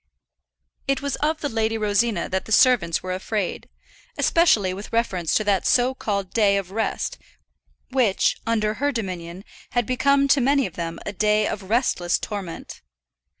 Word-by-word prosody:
It 275 Hz, 0 st, 0 dB
was 280 Hz, -, -1 dB
of 310 Hz, +1 st, -1 dB
the 290 Hz, -, -1 dB
Lady 225 Hz, -3 st, -1 dB
Rosina 210 Hz, -2 st, +1 dB
that 190 Hz, 0 st, -2 dB
the -, -, -10 dB
servants 220 Hz, -9 st, +4 dB
were 185 Hz, 0 st, -3 dB
afraid, 195 Hz, +1 st, -3 dB, 0.5 s
especially 220 Hz, -, +3 dB
with 200 Hz, +3 st, -8 dB
reference 190 Hz, -8 st, 0 dB
to 215 Hz, -, +2 dB
that 200 Hz, -3 st, +1 dB
so 250 Hz, +1 st, +3 dB
called 200 Hz, -7 st, -3 dB
day 205 Hz, -3 st, +3 dB
of 190 Hz, -2 st, -4 dB
rest 220 Hz, +2 st, -2 dB, 0.7 s
which, 245 Hz, -7 st, +2 dB
under 215 Hz, -2 st, +1 dB
her 285 Hz, 0 st, +2 dB
dominion, 185 Hz, -5 st, -5 dB, 0.3 s
had 240 Hz, -2 st, +1 dB
become 280 Hz, +3 st, +2 dB
to 275 Hz, -, +4 dB
many 275 Hz, +1 st, +3 dB
of 180 Hz, -, -6 dB
them 165 Hz, -1 st, -5 dB
a 205 Hz, -, -4 dB
day 210 Hz, +1 st, +2 dB
of 195 Hz, -2 st, -5 dB
restless 215 Hz, -7 st, +1 dB
torment. 195 Hz, -5 st, -7 dB
215 Hz, 160 wpm, -23 LUFS, 190-250 Hz, 0.7 s, servants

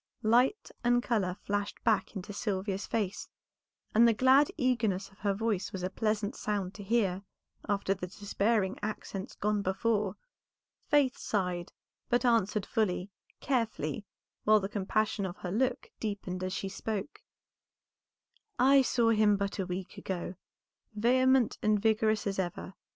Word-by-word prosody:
Light 245 Hz, -, +3 dB
and 245 Hz, 0 st, +3 dB
color 200 Hz, -8 st, 0 dB
flashed 205 Hz, 0 st, -3 dB
back 220 Hz, -1 st, +1 dB
into 200 Hz, +1 st, -6 dB
Sylvia's 195 Hz, -2 st, -2 dB
face, 205 Hz, -3 st, -2 dB, 0.6 s
and 230 Hz, +2 st, +6 dB
the 230 Hz, -, +3 dB
glad 265 Hz, +4 st, +5 dB
eagerness 230 Hz, -, +1 dB
of 195 Hz, -, -23 dB
her 200 Hz, -1 st, 0 dB
voice 210 Hz, -3 st, -1 dB
was 190 Hz, -3 st, -5 dB
a 185 Hz, -, -2 dB
pleasant 215 Hz, +2 st, -1 dB
sound 200 Hz, -3 st, -2 dB
to 205 Hz, -, -9 dB
hear 195 Hz, -3 st, +1 dB, 0.5 s
after 200 Hz, -1 st, +1 dB
the 185 Hz, -2 st, -6 dB
despairing 205 Hz, +1 st, 0 dB
accents 205 Hz, 0 st, -5 dB
gone 210 Hz, 0 st, 0 dB
before. 200 Hz, +1 st, 0 dB, 0.7 s
Faith 285 Hz, -4 st, +3 dB
sighed, 180 Hz, -4 st, -2 dB, 0.4 s
but 245 Hz, +1 st, +2 dB
answered 215 Hz, -4 st, +2 dB
fully, 200 Hz, -3 st, -1 dB, 0.3 s
carefully, 225 Hz, -, -1 dB, 0.4 s
while 215 Hz, 0 st, +5 dB
the 195 Hz, -, -3 dB
compassion 205 Hz, +1 st, -1 dB
of 185 Hz, -2 st, -4 dB
her 180 Hz, -, -5 dB
look 250 Hz, +5 st, 0 dB
deepened 195 Hz, -4 st, -4 dB
as 185 Hz, -, -2 dB
she 195 Hz, -, -3 dB
spoke. 210 Hz, +4 st, -4 dB, 1.4 s
"I 270 Hz, +2 st, +6 dB
saw 240 Hz, -2 st, +2 dB
him 210 Hz, -2 st, +4 dB
but 200 Hz, 0 st, -3 dB
a 190 Hz, -, -1 dB
week 185 Hz, 0 st, -5 dB
ago, 180 Hz, -1 st, -4 dB, 0.6 s
vehement 255 Hz, +2 st, +3 dB
and 215 Hz, -1 st, +3 dB
vigorous 220 Hz, 0 st, +2 dB
as 195 Hz, -1 st, -2 dB
ever. 185 Hz, +1 st, -3 dB
210 Hz, 145 wpm, -30 LUFS, 195-230 Hz, 1.4 s, and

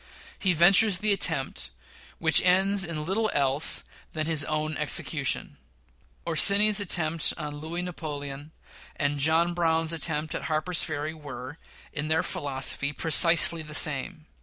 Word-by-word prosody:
He 190 Hz, -2 st, +1 dB
ventures 195 Hz, +4 st, +4 dB
the 210 Hz, +2 st, +1 dB
attempt, 195 Hz, -, -2 dB, 0.5 s
which -, -, +4 dB
ends 190 Hz, +2 st, +2 dB
in 160 Hz, -4 st, -5 dB
little 215 Hz, +5 st, -1 dB
else 140 Hz, +1 st, +3 dB, 0.3 s
than 155 Hz, -1 st, -3 dB
his 155 Hz, -2 st, +3 dB
own 155 Hz, 0 st, -3 dB
execution. -, -, 0 dB, 0.7 s
Orsini's 200 Hz, +5 st, +3 dB
attempt 165 Hz, -5 st, 0 dB
on 150 Hz, -2 st, -7 dB
Louis 165 Hz, +3 st, -5 dB
Napoleon 145 Hz, -4 st, -8 dB, 0.4 s
and 145 Hz, -1 st, -2 dB
John 160 Hz, +4 st, +1 dB
Brown's 165 Hz, -1 st, -1 dB
attempt 155 Hz, -1 st, -4 dB
at -, -, -6 dB
Harper's 155 Hz, +2 st, +1 dB
Ferry 155 Hz, 0 st, -5 dB
were, 145 Hz, -2 st, -10 dB, 0.3 s
in 150 Hz, +1 st, -5 dB
their 160 Hz, +3 st, 0 dB
philosophy, 140 Hz, -2 st, -2 dB
precisely 165 Hz, +2 st, +3 dB
the 150 Hz, -1 st, -8 dB
same. 155 Hz, +3 st, 0 dB
160 Hz, 135 wpm, -25 LUFS, 150-175 Hz, 0.7 s, ventures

